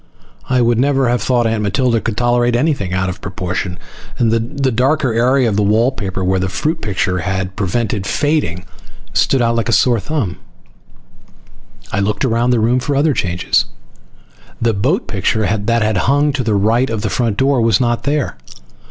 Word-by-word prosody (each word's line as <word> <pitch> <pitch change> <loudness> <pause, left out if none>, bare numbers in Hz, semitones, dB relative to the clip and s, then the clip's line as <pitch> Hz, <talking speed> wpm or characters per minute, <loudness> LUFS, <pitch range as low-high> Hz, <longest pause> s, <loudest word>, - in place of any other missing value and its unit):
I 130 -1 +2
would 120 -1 +2
never 135 -1 +2
have 120 0 0
thought 120 -2 +1
Aunt 110 -1 0
Matilda 115 +3 +1
could 110 -2 -3
tolerate 120 0 +2
anything 125 - 0
out 95 0 0
of 90 - -5
proportion. 90 -1 -4 0.4
And 115 -2 +2
the 130 +4 -1
darker 130 +2 +1
area 125 +2 +2
of 105 -2 0
wallpaper 105 -2 0
where 95 +1 +1
the 95 0 -1
fruit 160 - -2
picture 95 -2 -1
had 95 +1 -3
prevented 105 0 -2
fading 145 - -1 0.5
stood 135 -3 +2
out 115 0 +1
like 115 - -1
a - - +2
sore 120 -3 +3
thumb. 115 - -3 1.5
I 100 - -1
looked 100 +5 0
around 120 0 +1
the 120 -2 +3
room 120 +3 +2
for 140 +2 -2
other 145 +2 +2
changes. 90 -5 0 0.9
The 115 -1 +1
boat 100 0 0
picture 105 +1 -1
that 115 +3 0
had 110 -2 0
hung 145 +8 +2
to 135 -2 -1
the 110 -3 0
right 115 +6 +2
of 110 -2 -3
the - - 0
front 115 -5 0
door 135 -2 +2
was 115 +2 +3
not 120 -2 0
there. 145 0 -1
115 Hz, 180 wpm, -16 LUFS, 100-130 Hz, 1.5 s, sore